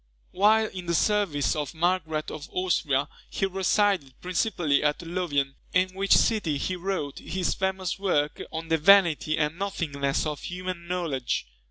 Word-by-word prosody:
While 215 +3 +4
in 185 -4 -7
the 170 - +1
service 185 -7 +1
of 150 +1 -4
Margaret 160 -2 0
of 145 - -8
Austria, 150 -7 +1 0.2
he 195 - -1
resided 190 - +1
principally 180 -5 0
at 150 +3 0
Louvain, 165 -6 -1 0.2
in 185 +1 +3
which 195 +1 +2
city 190 -10 +1
he 185 - -2
wrote 180 -6 -3
his 185 -1 -2
famous 190 -1 -2
work 150 -7 0
on 160 +1 -5
the 160 0 +2
Vanity 165 -3 +5
and 155 +2 -1
Nothingness 145 -9 -1
of 150 -2 -3
Human 180 -1 -5
Knowledge. 165 -8 -2
175 Hz, 150 wpm, -26 LUFS, 150-190 Hz, 0.2 s, Vanity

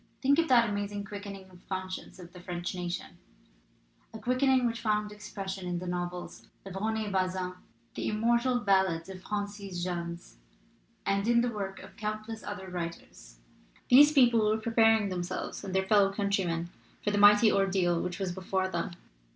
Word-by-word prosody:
Think 280 +3 +3
of 330 - +2
that 235 -4 +5
amazing 205 0 -3
quickening 200 -1 -8
of 180 - -16
the - - -28
conscience 185 -1 -5
of 175 -2 -12
the 180 - -11
French 175 0 -4
nation, 175 -1 -5 0.9
a 220 - -8
quickening 255 +3 +2
which 230 -1 -1
found 210 -2 0
expression 195 -2 -6
in 175 0 -2
the 180 - -5
novels 175 0 -5 0.2
of 195 - -7
Rene 215 +1 -1
Bazin, 185 -1 -1 0.4
the - - -3
immortal 235 +3 +2
ballads 190 -4 +2
of 185 -1 -8
Francis 205 -3 -4
Jammes, 170 - -5 0.7
and 200 +2 +1
in 235 0 +4
the 245 0 0
work 195 -3 -5
of - - -14
countless 215 +1 -4
other 205 -2 -6
writers! 165 - -7 0.5
These 290 +4 +9
people 240 -6 +5
were 215 - +2
preparing 225 -2 +3
themselves 180 +1 -4
and 190 -1 -5
their 190 0 +2
fellow 200 -1 +4
countrymen 190 -4 -1 0.3
for 205 - +1
the 205 - +1
mighty 210 +2 +7
ordeal 190 -3 +2
which 180 0 -3
was 190 -2 -2
before 190 +1 -1
them. 170 0 -3
195 Hz, 165 wpm, -30 LUFS, 180-215 Hz, 0.9 s, These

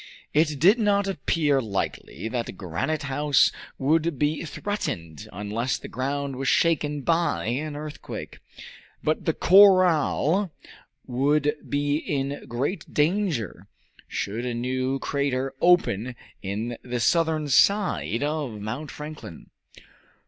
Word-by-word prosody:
It 150 -1 +2
did 195 - +5
not 200 -2 +2
appear 150 -5 +1
likely 110 0 -4
that 115 -5 -4
Granite 100 - -2
House 140 0 +3 0.3
would 160 +2 +1
be 150 +3 0
threatened 110 - -4
unless 105 +6 -2
the - - -9
ground 140 +1 -3
was 135 0 -3
shaken 150 +1 +2
by 165 - +1
an 145 +6 -2
earthquake. 150 0 -7 0.6
But 155 - 0
the 160 - +1
corral 185 -1 +5 0.5
would 145 +4 +1 0.2
be 145 +1 +1
in 140 -2 -3
great 140 +9 -3
danger 160 - 0 0.4
should 110 +4 -3
a 125 -1 -2
new 130 +2 -1
crater 135 -1 -1
open 125 - +3 0.3
in 110 +5 -4
the 125 -1 -4
southern 160 +3 +2
side 175 - +2
of 145 -7 -2
Mount 120 +9 -5
Franklin. 150 - -9
145 Hz, 115 wpm, -25 LUFS, 125-160 Hz, 0.6 s, did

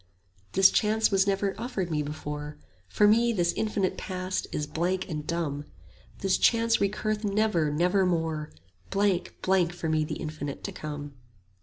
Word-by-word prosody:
This 190 0 +6
chance 220 0 +2
was 195 0 +3
never 195 0 +1
offered 195 -8 -3
me 150 -1 +1
before; 150 0 -5 0.3
For 210 - +4
me 235 +3 +4
this 175 -6 +1
infinite 210 -3 -1
Past 185 -1 -3
is 150 - -2
blank 175 +5 -1
and 150 -3 -5
dumb: 150 -4 -2 0.6
This 195 -1 +2
chance 230 0 +4
recurreth 210 +2 -1
never, 200 -6 +1
nevermore; 165 -2 +1 0.4
Blank, 195 -2 0
blank 185 -2 +2
for 175 -2 -4
me 155 -1 +2
the 150 - -4
infinite 150 -2 -5
To - - -4
come. 145 -1 -6
180 Hz, 150 wpm, -28 LUFS, 155-200 Hz, 0.6 s, This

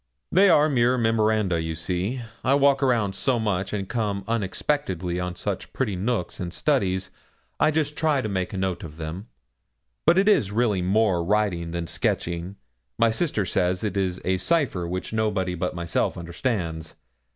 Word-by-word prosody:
'They 195 +2 +6
are 155 -3 +6
mere 125 -3 +2
memoranda, 110 -6 +2
you 80 0 -3
see. 90 +9 -2 0.2
I 135 +3 +4
walk 140 -1 +4 0.3
so 125 +5 0
much 100 -4 -1
and 100 -2 -3
come 105 -4 -2
unexpectedly 95 - -1
on 90 0 -3
such - - -4
pretty 110 -8 -1
nooks 100 -1 -2
and 90 -2 -4
studies, 95 - 0 0.5
I - - +4
just 150 -1 0
try 150 -4 +1
to - - -1
make 95 -3 -2
a 100 - -5
note 95 -1 -2
of 80 -2 -9
them, 85 +6 -6 0.8
but 175 - +6
it 195 +2 +4
is 160 - +4
really 105 -4 +1
more 95 -1 +2
writing 95 -3 0
than 85 0 -3
sketching; 85 +3 -2 0.4
my 115 - +4
sister 110 - 0
says 90 +1 0
it 105 -2 -2
is 95 -2 -1
a 95 0 +2
cipher 125 - 0
which 90 +4 -4
nobody 105 -4 0
but 90 +1 -3
myself 85 -1 -1
understands. 85 -2 -3
100 Hz, 165 wpm, -25 LUFS, 90-120 Hz, 0.8 s, They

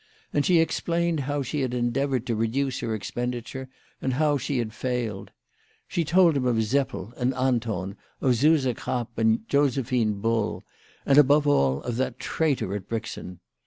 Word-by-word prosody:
And 145 - +2
she 175 -2 +5
ex 165 - +1
plained 170 -1 0
how 145 +1 -1
she 145 +3 -2
had 125 -2 -1
endeavoured 125 +1 0
to 120 - -1
reduce 125 +4 -1
her 110 -2 -2
expen 125 +4 -3
diture, 130 +2 -7 0.3
and 130 - -1
how 150 +1 +2
she 140 0 -2
had 115 -3 -2
failed. 120 -5 -3 0.6
She 170 - -1
told 170 0 +4
him 130 -2 +1
of 120 - +2
Seppel 125 -3 -1
and 125 +1 0
Anton, 115 -7 -1 0.2
of 130 -2 +2
Suse 150 +3 +4
Krapp 120 0 -4
and 110 0 +2
Josephine 125 -6 +1
Bull, 115 0 -1 0.4
and, 140 +1 +6
above 145 +1 +5
all, 70 - +2
of 120 -1 -3
that 130 - -1
traitor 145 - -1
at 100 -1 -6
Brixen 110 -6 -5
125 Hz, 170 wpm, -26 LUFS, 115-140 Hz, 0.6 s, and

